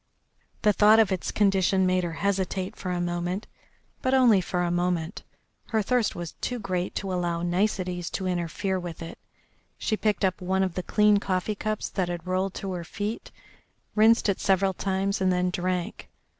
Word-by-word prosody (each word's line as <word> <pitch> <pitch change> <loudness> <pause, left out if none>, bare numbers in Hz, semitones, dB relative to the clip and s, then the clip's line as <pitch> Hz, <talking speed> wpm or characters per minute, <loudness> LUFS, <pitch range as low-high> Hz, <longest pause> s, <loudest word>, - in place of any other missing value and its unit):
The 210 -1 +5
thought 210 +2 +6
of 220 -3 +4
its 185 - -2
condition 195 -2 +3
made 185 0 +2
her 170 -1 -3
hesitate 190 -1 -1
for 185 - -6
a 180 -1 -1
moment, 175 +3 -2 0.6
but 260 +1 +2
only 235 -7 +5
for 180 0 -1
a 175 - 0
moment. 175 0 -1 0.5
Her 220 -2 +1
thirst 245 0 +1
was 175 -1 -5
too 250 - -2
great 185 -4 -3
to 195 -2 -3
allow 175 -1 -1
niceties 180 -1 -1
to 190 - -5
interfere 180 +2 -1
with 170 -2 -7
it. 165 - -9 0.6
She 220 - 0
picked 210 -1 +1
up 185 -1 -1
one 190 +1 +1
of 185 -2 -1
the 185 - -2
clean 210 +2 +3
coffee 190 +1 -1
cups 215 +1 -3
that 185 -3 -1
had 175 -1 -5
rolled 185 +1 -1
to 195 - -4
her 175 -2 -4
feet, 210 +5 -5 0.6
rinsed 220 +2 +5
it 200 - +1
several 190 0 +2
times, 195 +1 -1
and 185 -1 +3
then 180 0 +1
drank. 180 -1 -3
185 Hz, 185 wpm, -26 LUFS, 180-205 Hz, 0.6 s, thought